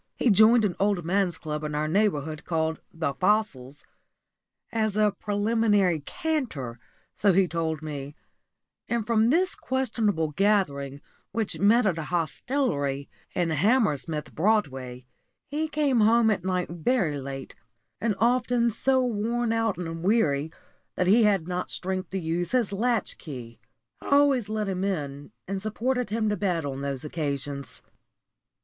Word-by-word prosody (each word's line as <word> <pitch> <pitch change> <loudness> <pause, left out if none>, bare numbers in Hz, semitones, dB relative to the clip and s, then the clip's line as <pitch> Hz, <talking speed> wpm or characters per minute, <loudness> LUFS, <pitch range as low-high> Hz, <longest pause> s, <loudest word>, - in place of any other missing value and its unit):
He 245 - +3
joined 220 +3 +6
an 180 -4 -1
old 200 -4 +1
man's 185 -1 +1
club 150 -1 -5
in 150 0 -3
our 150 +1 0
neighbourhood 155 -5 0
called 160 -1 -1
the 160 -4 -2
"Fossils" 150 -9 0 0.9
"as 220 -3 0
a 210 -1 +4
preliminary 205 -4 +1
canter," 145 - -3 0.4
so 200 -2 +3
he 190 0 +4
told 160 -2 -2
me; 145 -2 -6 0.7
and 235 -2 0
from 225 0 +3
this 365 +7 +2
questionable 220 -11 -1
gathering, 145 -8 +1 0.3
which 220 0 -1
met 220 +4 +4
at 180 -5 +1
a 155 - -4
hostelry 160 - -1 0.3
in 175 -3 +1
Hammersmith 160 - +1
Broadway, 135 - 0 0.4
he 305 +3 -2
came 290 -5 +1
home 220 +1 +5
at 185 -4 -1
night 180 -2 -1
very 170 - 0
late, 135 0 -7 0.5
and 220 -3 0
often 240 0 +2
so 260 +3 +2
worn 235 +1 0
out 225 -2 0
and 165 -2 -5
weary 160 -7 +2 0.4
that 180 - +1
he 215 +5 +5
had 195 -6 +2
not 180 0 -3
strength 185 -1 -3
to 190 - -3
use 170 +4 -2
his 235 -6 +1
latch 230 +2 0
key. 120 - -9 0.4
I - - -9
always 280 -6 +4
let 215 -1 -1
him 190 -1 -2
in, 145 -6 -3 0.2
and 195 0 -3
supported 245 +3 -1
him 220 +1 0
to 210 - +1
bed 175 -6 0
on 135 -1 -4
these 140 0 -3
occasions. 140 -3 -4
190 Hz, 145 wpm, -26 LUFS, 155-225 Hz, 0.9 s, joined